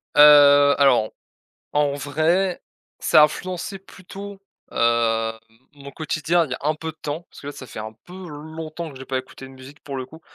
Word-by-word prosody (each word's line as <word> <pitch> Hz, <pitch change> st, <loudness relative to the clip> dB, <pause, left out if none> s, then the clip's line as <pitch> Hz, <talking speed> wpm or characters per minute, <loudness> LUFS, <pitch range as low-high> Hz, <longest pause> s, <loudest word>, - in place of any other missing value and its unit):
Heu, 145 Hz, -1 st, +8 dB
alors, 125 Hz, -6 st, +4 dB, 0.6 s
en 145 Hz, -1 st, +2 dB
vrai, 160 Hz, +7 st, 0 dB, 0.4 s
ça -, -, +5 dB
a -, -, +9 dB
influencé 185 Hz, +5 st, -6 dB
plutôt, 195 Hz, +1 st, -11 dB, 0.3 s
hem, 115 Hz, -1 st, +1 dB, 0.4 s
mon 140 Hz, -1 st, -11 dB
quotidien 155 Hz, +3 st, 0 dB
il 135 Hz, -, -12 dB
y -, -, 0 dB
a -, -, -4 dB
un 155 Hz, +2 st, 0 dB
peu 160 Hz, +1 st, -5 dB
de 155 Hz, -, -29 dB
temps 150 Hz, +3 st, -4 dB
parce -, -, -14 dB
que 140 Hz, -, -9 dB
là, 145 Hz, -, -5 dB
ça 130 Hz, -, -10 dB
fait -, -, -9 dB
un 110 Hz, +1 st, -7 dB
peu 175 Hz, -, -13 dB
longtemps 155 Hz, +1 st, -7 dB
que 135 Hz, -, -12 dB
j'ai 130 Hz, -, -10 dB
pas 130 Hz, 0 st, -2 dB
écouté 130 Hz, +1 st, -9 dB
de -, -, -14 dB
musique, 130 Hz, +3 st, -14 dB
pour 140 Hz, -, -6 dB
le 130 Hz, -, -4 dB
coup. 160 Hz, +5 st, -15 dB
145 Hz, 205 wpm, -22 LUFS, 135-160 Hz, 0.6 s, a